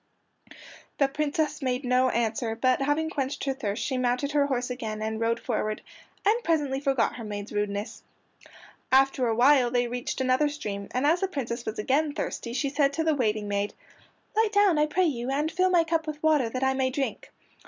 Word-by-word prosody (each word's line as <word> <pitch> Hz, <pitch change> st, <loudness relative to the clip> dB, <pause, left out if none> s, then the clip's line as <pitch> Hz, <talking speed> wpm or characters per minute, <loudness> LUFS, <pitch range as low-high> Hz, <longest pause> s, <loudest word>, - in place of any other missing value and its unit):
The 275 Hz, -, +3 dB
Princess 300 Hz, +3 st, -1 dB
made 255 Hz, 0 st, -1 dB
no 255 Hz, +1 st, +3 dB
answer, 230 Hz, 0 st, -1 dB
but 255 Hz, +3 st, +2 dB
having 300 Hz, +3 st, 0 dB
quenched 275 Hz, -2 st, -3 dB
her 275 Hz, -, 0 dB
thirst 220 Hz, -5 st, -3 dB
she 260 Hz, -3 st, -1 dB
mounted 250 Hz, +3 st, 0 dB
her 290 Hz, -1 st, +2 dB
horse 250 Hz, -2 st, -1 dB
again 220 Hz, -4 st, -4 dB
and 220 Hz, 0 st, -3 dB
rode 230 Hz, +1 st, 0 dB
forward, 215 Hz, 0 st, -2 dB, 0.4 s
and 450 Hz, +4 st, +3 dB
presently 290 Hz, -5 st, +1 dB
forgot 270 Hz, -5 st, +1 dB
her 235 Hz, -, -7 dB
maid's 205 Hz, -1 st, -6 dB
rudeness. 205 Hz, 0 st, -3 dB, 0.9 s
After 265 Hz, -1 st, +4 dB
awhile 245 Hz, +3 st, +4 dB
they 245 Hz, 0 st, +1 dB
reached 245 Hz, +2 st, -4 dB
another 260 Hz, +3 st, +2 dB
stream, 205 Hz, -9 st, -5 dB
and 255 Hz, +3 st, -1 dB
as 325 Hz, +4 st, +4 dB
the 385 Hz, -, 0 dB
Princess 245 Hz, -8 st, -4 dB
was 220 Hz, -, -3 dB
again 285 Hz, +7 st, +1 dB
thirsty, 235 Hz, -, -4 dB
she 275 Hz, +2 st, 0 dB
said 280 Hz, 0 st, +2 dB
to 320 Hz, -, -1 dB
the 320 Hz, -1 st, +2 dB
waiting 215 Hz, -6 st, 0 dB
maid, 200 Hz, 0 st, -2 dB, 0.6 s
"Light 440 Hz, -1 st, +3 dB
down, 400 Hz, -6 st, +4 dB
I 300 Hz, -, +3 dB
pray 365 Hz, +5 st, +2 dB
you, 250 Hz, -6 st, -2 dB
and 295 Hz, +4 st, 0 dB
fill 365 Hz, +3 st, +2 dB
my 350 Hz, -2 st, +4 dB
cup 325 Hz, -1 st, -1 dB
with 300 Hz, 0 st, -6 dB
water, 300 Hz, -7 st, +3 dB
that 255 Hz, +3 st, -3 dB
I 265 Hz, 0 st, +3 dB
may 265 Hz, -1 st, +1 dB
drink." 270 Hz, +1 st, -3 dB
265 Hz, 195 wpm, -27 LUFS, 235-300 Hz, 0.9 s, After